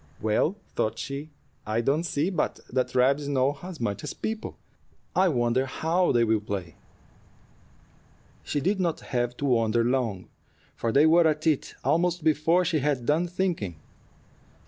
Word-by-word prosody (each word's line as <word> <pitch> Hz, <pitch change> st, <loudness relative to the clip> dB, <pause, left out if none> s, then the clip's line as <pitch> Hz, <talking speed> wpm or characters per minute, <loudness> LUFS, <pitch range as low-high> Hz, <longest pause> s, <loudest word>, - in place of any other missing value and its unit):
"Well," 110 Hz, -, +1 dB, 0.2 s
thought 110 Hz, +1 st, 0 dB
she, 140 Hz, +5 st, -5 dB, 0.3 s
"I 110 Hz, +2 st, -1 dB
don't 140 Hz, +6 st, +1 dB
see 160 Hz, +3 st, 0 dB
but 180 Hz, -, -1 dB
that 130 Hz, 0 st, -1 dB
rabbits 140 Hz, +3 st, +3 dB
know 140 Hz, 0 st, +1 dB
as 180 Hz, -2 st, -8 dB
much 105 Hz, -4 st, -2 dB
as -, -, -5 dB
people. 220 Hz, 0 st, -4 dB, 0.6 s
I 190 Hz, +1 st, +4 dB
wonder 125 Hz, -1 st, +1 dB
how 170 Hz, +6 st, +1 dB
they 120 Hz, -, +3 dB
will 110 Hz, -1 st, +2 dB
play." 95 Hz, -6 st, -5 dB, 1.7 s
She 145 Hz, -, -2 dB
did 195 Hz, +6 st, 0 dB
not 170 Hz, -3 st, -1 dB
have 120 Hz, -1 st, -2 dB
to 145 Hz, -, -3 dB
wonder 115 Hz, -3 st, +2 dB
long, 120 Hz, -6 st, -1 dB, 0.5 s
for 115 Hz, -, -1 dB
they 145 Hz, +6 st, +5 dB
were 165 Hz, +1 st, +5 dB
at 155 Hz, 0 st, -1 dB
it 155 Hz, -4 st, 0 dB
almost 170 Hz, +4 st, +1 dB
before 160 Hz, +3 st, +3 dB
she 160 Hz, -2 st, +1 dB
had 140 Hz, -3 st, -1 dB
done 160 Hz, +6 st, +2 dB
thinking. 170 Hz, -, -2 dB
140 Hz, 155 wpm, -26 LUFS, 120-165 Hz, 1.7 s, they